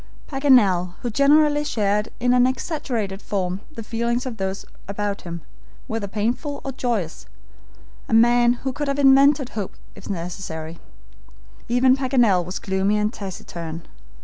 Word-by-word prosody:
Paganel, 210 Hz, -, +3 dB
who 240 Hz, -, -2 dB
generally 295 Hz, +3 st, +4 dB
shared 210 Hz, -5 st, 0 dB
in 245 Hz, 0 st, +2 dB
an 250 Hz, 0 st, +5 dB
exaggerated 240 Hz, -, -3 dB
form 185 Hz, -1 st, -2 dB
the 230 Hz, -7 st, -8 dB
feelings 235 Hz, +3 st, -1 dB
of 245 Hz, -3 st, -5 dB
those 190 Hz, 0 st, -3 dB, 0.2 s
about 200 Hz, 0 st, -3 dB
him, 170 Hz, -1 st, -7 dB, 0.4 s
whether 220 Hz, -2 st, -3 dB
painful 240 Hz, +8 st, -2 dB
or 270 Hz, -, -3 dB
joyous 230 Hz, -10 st, -3 dB, 0.8 s
a -, -, -2 dB
man 240 Hz, +1 st, +5 dB
who 265 Hz, -, -1 dB
could 295 Hz, +2 st, -3 dB
have 275 Hz, 0 st, -1 dB
invented 275 Hz, -1 st, +5 dB
hope 205 Hz, -4 st, -5 dB, 0.2 s
if -, -, -12 dB
necessary 165 Hz, -3 st, -5 dB, 0.9 s
even 255 Hz, +2 st, +4 dB
Paganel 245 Hz, -9 st, +3 dB
was 180 Hz, +3 st, -5 dB
gloomy 195 Hz, +2 st, 0 dB
and 210 Hz, +2 st, 0 dB
taciturn. 170 Hz, -4 st, -7 dB
225 Hz, 140 wpm, -22 LUFS, 190-260 Hz, 0.9 s, an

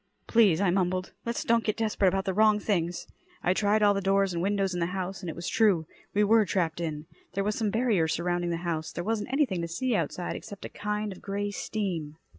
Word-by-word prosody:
"Please," 210 Hz, -8 st, +4 dB
I 195 Hz, -3 st, +3 dB
mumbled. 185 Hz, 0 st, 0 dB
"Let's 235 Hz, -, -1 dB
don't 230 Hz, 0 st, +3 dB
get 215 Hz, -, -1 dB
desperate 215 Hz, -3 st, +1 dB
about 190 Hz, +1 st, +1 dB
the 190 Hz, -, 0 dB
wrong 215 Hz, +1 st, +5 dB
things." 175 Hz, -5 st, -1 dB, 0.4 s
I 180 Hz, -, +3 dB
tried 210 Hz, +2 st, +2 dB
all 205 Hz, -1 st, +6 dB
the 200 Hz, -, -1 dB
doors 195 Hz, 0 st, +2 dB
and 170 Hz, -, -2 dB
windows 195 Hz, 0 st, 0 dB
in 175 Hz, -, -2 dB
the 170 Hz, -, +1 dB
house, 190 Hz, +1 st, -4 dB
and 180 Hz, -, -5 dB
it -, -, -5 dB
was 170 Hz, -, -5 dB
true. 200 Hz, -8 st, +3 dB, 0.3 s
We 210 Hz, -, +4 dB
were 220 Hz, +1 st, +5 dB
trapped 170 Hz, -4 st, -1 dB
in. 155 Hz, -2 st, -3 dB, 0.3 s
There 195 Hz, -, +1 dB
was 210 Hz, +1 st, 0 dB
some 215 Hz, -1 st, 0 dB
barrier 220 Hz, -7 st, +2 dB
surrounding 175 Hz, +2 st, -1 dB
the 170 Hz, -, -1 dB
house. 160 Hz, -2 st, -2 dB
There 175 Hz, -, -4 dB
wasn't 220 Hz, +2 st, -2 dB
anything 260 Hz, -, +1 dB
to 170 Hz, -, -2 dB
see 245 Hz, +10 st, -1 dB
outside 175 Hz, -1 st, -2 dB
except 205 Hz, -3 st, -8 dB
a -, -, -6 dB
kind 210 Hz, 0 st, -3 dB
of 190 Hz, -, -10 dB
grey 205 Hz, +1 st, -2 dB
steam. 175 Hz, -8 st, -3 dB
195 Hz, 235 wpm, -28 LUFS, 175-210 Hz, 0.4 s, all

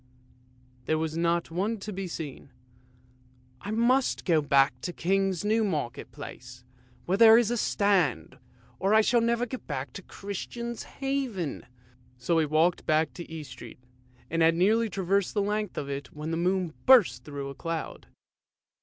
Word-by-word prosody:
" 125 Hz, 0 st, -32 dB
There 155 Hz, -, +2 dB
was 160 Hz, 0 st, -2 dB
not 170 Hz, 0 st, 0 dB
one 200 Hz, +7 st, -1 dB
to 210 Hz, +1 st, -6 dB
be 190 Hz, 0 st, -4 dB
seen. 150 Hz, -5 st, -7 dB, 0.6 s
" 125 Hz, 0 st, -32 dB
I 200 Hz, -, -7 dB
must 240 Hz, +4 st, +1 dB
go 165 Hz, -4 st, +3 dB
back 135 Hz, -3 st, +3 dB
to -, -, -3 dB
the -, -, -22 dB
King's 195 Hz, +1 st, 0 dB
New 220 Hz, +2 st, +2 dB
Market 150 Hz, -, -3 dB
Place, 120 Hz, 0 st, -10 dB, 0.4 s
where 190 Hz, +4 st, 0 dB
there 225 Hz, -1 st, +9 dB
is 235 Hz, -1 st, +2 dB
a -, -, +1 dB
stand, 190 Hz, -, +1 dB, 0.4 s
or 195 Hz, +3 st, +2 dB
I 220 Hz, -, +7 dB
shall 235 Hz, +2 st, +3 dB
never 235 Hz, +1 st, +1 dB
get 255 Hz, +1 st, -8 dB
back, 140 Hz, -2 st, -4 dB
to -, -, -7 dB
Christian's 235 Hz, +5 st, -6 dB, 0.2 s
Haven." 260 Hz, -, -2 dB, 0.5 s
So 125 Hz, +7 st, -1 dB
then 165 Hz, -, +4 dB
he -, -, +1 dB
walked 160 Hz, +4 st, +1 dB
back 155 Hz, -3 st, +2 dB
to 170 Hz, +3 st, -9 dB
East 155 Hz, -4 st, -7 dB
Street, -, -, -10 dB, 0.5 s
and 165 Hz, 0 st, -1 dB
had 165 Hz, 0 st, +5 dB
nearly 220 Hz, +6 st, +3 dB
traversed 195 Hz, +1 st, 0 dB
the 205 Hz, -, +2 dB
length 210 Hz, +1 st, -2 dB
of 140 Hz, -, -3 dB
it, 140 Hz, -1 st, -5 dB
when 150 Hz, +2 st, -6 dB
the -, -, 0 dB
moon 180 Hz, -1 st, 0 dB
burst 135 Hz, -, +6 dB
through 140 Hz, -1 st, -6 dB
a -, -, -7 dB
cloud. 165 Hz, +3 st, -5 dB
170 Hz, 180 wpm, -28 LUFS, 145-210 Hz, 0.6 s, there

